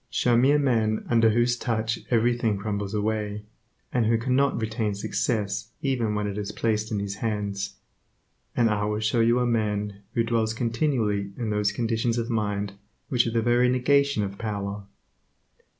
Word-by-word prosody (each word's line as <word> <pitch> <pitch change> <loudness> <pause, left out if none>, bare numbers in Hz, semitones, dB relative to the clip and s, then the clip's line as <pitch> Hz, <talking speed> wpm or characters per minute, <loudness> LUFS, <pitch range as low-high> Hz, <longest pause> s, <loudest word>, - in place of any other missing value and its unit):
Show 120 -1 +2
me 125 +3 +5
a 145 - +5
man 115 -6 +1
under 115 -1 +5
whose 120 +2 +2
touch 115 -1 -1
everything 120 -2 +2
crumbles 100 0 -3
away, 105 0 -1 0.5
and 120 -3 +2
who 115 0 +3
cannot 130 +4 +1
retain 110 -2 -1
success 105 +1 -2
even 120 -6 0
when 105 0 -1
it 100 0 -3
is 105 -1 -4
placed 110 0 -1
in 105 - 0
his 100 -1 -3
hands, 100 -2 -3 0.8
and 120 - +4
I 105 0 0
will 105 0 -1
show 110 +2 +1
you 115 +1 +4
a 125 - +2
man 105 -3 -1
who 115 - +3
dwells 115 -1 0
continually 115 -5 0
in 115 -3 -2
those 105 -1 +1
conditions 115 +2 0
of 115 +1 -2
mind 105 -2 -1 0.4
which 120 -2 +2
are - - -1
the 115 0 +1
very 120 +1 +3
negation 140 -1 +2
of 100 0 -5
power. 100 -2 -4
110 Hz, 170 wpm, -26 LUFS, 105-120 Hz, 0.8 s, me